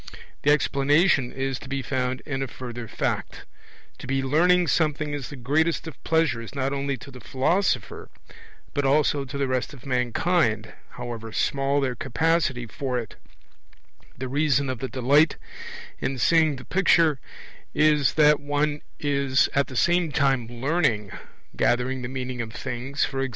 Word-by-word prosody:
The 145 - +2
explanation 145 0 +3
is 135 -1 -3
to - - -11
be 135 0 -2
found 130 0 -2
in 135 -3 -3
a 135 - -1
further 120 -2 -7
fact: - - -3 0.5
to - - -9
be 135 0 0
learning 175 +6 +3
something 150 -2 0
is 140 -3 -5
the 145 - -8
greatest 150 +7 0
of 160 - -10
pleasures 145 -8 0
not 135 0 -1
only 140 -1 -2
to 140 - -12
the 130 - -11
philosopher 135 - -1 0.6
but 145 - 0
also 140 0 +2
to 135 +2 -6
the 140 -1 0
rest 130 +2 -2
of 125 - -16
mankind, 125 - 0 0.2
however 120 -2 -6
small 140 +4 +1
their 130 -2 0
capacity 140 -1 0
for 125 +3 -3
it; 115 -3 -5 1.0
the 130 - -4
reason 140 -1 +1
of 130 - -5
the 130 - -4
delight 140 +5 +3 0.6
in 135 0 -2
seeing 160 +3 +3
the 130 - -10
picture 165 -6 +3 0.6
is 150 -2 +3
that 150 -1 +5
one 145 +1 -1 0.2
is 140 -2 +2
at 140 0 +2
the 130 - -9
same 170 0 +2
time 135 -4 +1
learning 120 - 0 0.4
gathering 125 +2 +1
the 120 - -4
meaning 130 -1 -4
of 110 -1 -6
things, 130 +3 -2
e.g. 135 0 -1
135 Hz, 155 wpm, -25 LUFS, 125-150 Hz, 1.0 s, that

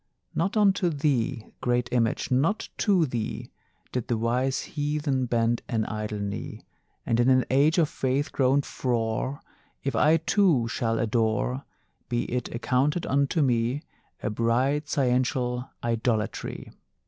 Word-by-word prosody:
Not 195 +7 0
unto 195 -4 +3
thee, 140 -7 0 0.2
great 120 -1 +1
Image, 115 0 0
not 150 +12 +1
to 190 -6 +3
thee 120 -5 -4 0.4
Did 125 -3 -3
the 120 - 0
wise 125 +4 0
heathen 145 -3 -1
bend 115 0 +1
an 110 -2 0
idle 105 0 -4
knee; 100 -1 -5 0.4
And 115 - +1
in 120 +2 +4
an 130 -1 +4
age 145 +5 +4
of 165 -3 +4
faith 135 +1 -1
grown 135 +1 +2
frore 120 +2 -2 0.4
If 135 - -1
I 155 +2 +5
too 165 - +2
shall 115 0 -1
adore, 115 +3 0 0.4
Be 120 0 0
it 125 -1 -2
accounted 130 +7 0
unto 140 +3 +2
me, 125 +3 +1 0.4
A 105 - -1
bright 125 +7 +1
sciential 125 -2 0
idolatry! 115 -2 -2
125 Hz, 135 wpm, -26 LUFS, 115-145 Hz, 0.4 s, I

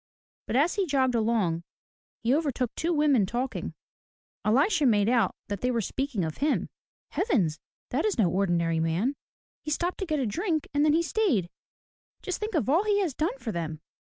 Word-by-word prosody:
But - - -2
as 300 +7 +3
he 395 -3 0
jogged 265 -3 +2
along 220 -8 +1 0.6
he 235 +3 +3
overtook 275 -5 0
two 335 +2 -1
women 290 - +3
talking. 245 +5 -3 0.7
Elisha 285 - +3
made 205 -3 +3
out 235 -1 +2
that 205 -2 -4
they 250 - +1
were 240 -2 +1
speaking 235 - -2
of 155 - -5
him. 295 +2 0 0.4
"Heavens! 200 - +1 0.3
That - - 0
is 425 -7 0
no 215 -6 +4
ordinary 170 -3 +1
man. 170 - 0 0.5
He - - -6
stopped 345 +4 -1
to 385 - -3
get 310 -2 0
a 270 - 0
drink 310 - -1
and 290 0 +3
then 300 -1 +4
he 335 +2 +3
stayed. 290 - +1 0.7
Just 375 - -3
think 425 -2 -3
of 305 - +1
all 320 +9 +3
he 415 -1 +2
has 345 -8 -1
done 340 - -1
for 230 - -4
them 160 -4 -4
260 Hz, 190 wpm, -27 LUFS, 205-320 Hz, 0.7 s, no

